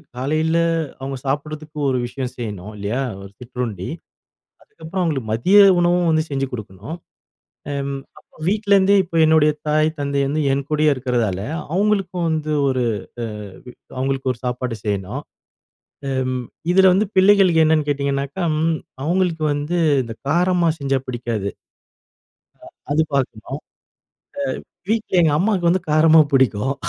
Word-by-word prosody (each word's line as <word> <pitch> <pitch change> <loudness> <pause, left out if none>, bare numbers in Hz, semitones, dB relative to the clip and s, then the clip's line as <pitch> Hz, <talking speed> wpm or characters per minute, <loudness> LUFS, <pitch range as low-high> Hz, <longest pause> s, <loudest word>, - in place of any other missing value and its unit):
காலையில 155 +5 0 0.4
அவுங்க 135 0 -5
சாப்பிடுறதுக்கு 150 +2 -4
ஒரு 130 - +1
விஷயம் 125 0 -5
செய்யணும் 105 -3 -6
இல்லையா? 105 +6 -2 0.2
ஒரு 100 0 -11
சிற்றுண்டி. 120 -6 -5 0.7
அதுக்கப்பறம் 165 +4 -6
அவுங்களுக்கு 135 -10 -2
மதிய 180 - +3 0.2
உணவும் 175 0 +2
வந்து 155 0 +2
செஞ்சு 135 -1 -1
குடுக்கணும். 110 - -7 0.8
அம் 140 -1 -3 0.2
அப்போ - - -24
வீட்லேருந்தே 200 -1 +3
இப்ப 170 -2 -6
என்னுடைய 155 -1 +4 0.2
தாய் 155 +1 +3
தந்தை 140 0 -1
வந்து 150 +3 0
என் 135 0 -1
கூடயே 155 0 +3
இருக்கிறதால, 120 -7 -1 0.4
அவுங்களுக்கும் 195 -3 +1
வந்து 155 -1 -1 0.2
ஒரு 130 -2 0 0.4
அ - - -1 0.7
அவுங்களுக்கு 135 0 -1
ஒரு 120 - -14
சாப்பாடு 125 -1 -2
செய்யணும். 100 -3 -3 0.9
ம் 130 -1 -1 0.3
இதில 190 0 +6
வந்து 195 +3 +2
பிள்ளைகளுக்கு 190 -4 +5
என்னென்னு 155 -1 +2
கேட்டீங்கன்னாக்கா, 140 +3 -1 0.2
ம் 160 0 +1 0.3
அவுங்களுக்கு 175 -1 0
வந்து 150 +5 -2 0.2
இந்த 115 -1 -7 0.2
காரமா 175 +2 +2
செஞ்சா 135 -2 0
பிடிக்காது. 115 -5 -3 1.4
அ - - -11
அது 160 - +4
பாக்கணும். 130 0 -2 1.1
அ 180 - -37
வீட்ல 215 -5 +1
எங்க 155 -3 +3
அம்மாக்கு 190 -3 +1
வந்து 185 +2 +2
காரமா 155 +1 +6
புடிக்கும். 130 0 +2
145 Hz, 130 wpm, -20 LUFS, 125-170 Hz, 1.4 s, இதில